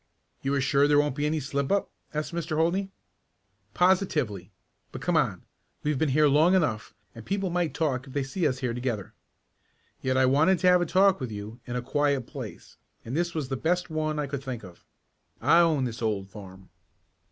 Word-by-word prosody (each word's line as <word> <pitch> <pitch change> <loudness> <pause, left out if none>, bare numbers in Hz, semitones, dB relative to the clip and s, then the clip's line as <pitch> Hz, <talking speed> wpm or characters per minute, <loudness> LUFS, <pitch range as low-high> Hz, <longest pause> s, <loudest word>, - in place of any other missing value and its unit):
"You 135 - -1
are 140 - +1
sure 140 +2 +3
there 145 0 +4
won't 145 -2 +2
be 145 +1 0
any 155 +1 0
slip 140 0 -2
up?" 200 0 +1 0.2
asked 150 +2 -3
Mr. 165 -2 -2
Holdney. 180 +5 +1 0.9
"Positively. 155 - +1 0.4
But - - -7
come - - +1
on. - - +1 0.4
We've 150 -3 0
been 160 - +2
here 150 +3 +4
long 155 +6 +4
enough 120 - 0 0.2
and 115 - -10
people 195 - -2
might 175 -5 -1
talk 140 -4 -1
if 130 - -11
they 140 - 0
saw 150 +4 0
us 130 - -3
here 125 -3 -1
together. 120 -5 -3 0.9
Yet 130 0 0
I 130 - +5
wanted 155 +8 +4
to 185 - +1
have 180 0 +5
a 175 - 0
talk 195 +2 +4
with 125 -4 -4
you 105 +3 -7
in 120 - -4
a 125 - -2
quiet 140 +1 +1
place, - - -9 0.3
and 120 +4 -4
this 170 +1 -1
was 150 -5 -3
the 135 - -1
best 175 +4 0
one 155 -1 -1
I 150 - -1
could 140 -1 -5
think 125 -4 -5
of. 90 -3 -13 0.6
I 165 - +5
own 160 -5 +3
this 120 -2 -4
old 100 -4 -2
farm." 95 -2 -12
145 Hz, 205 wpm, -27 LUFS, 125-165 Hz, 0.9 s, I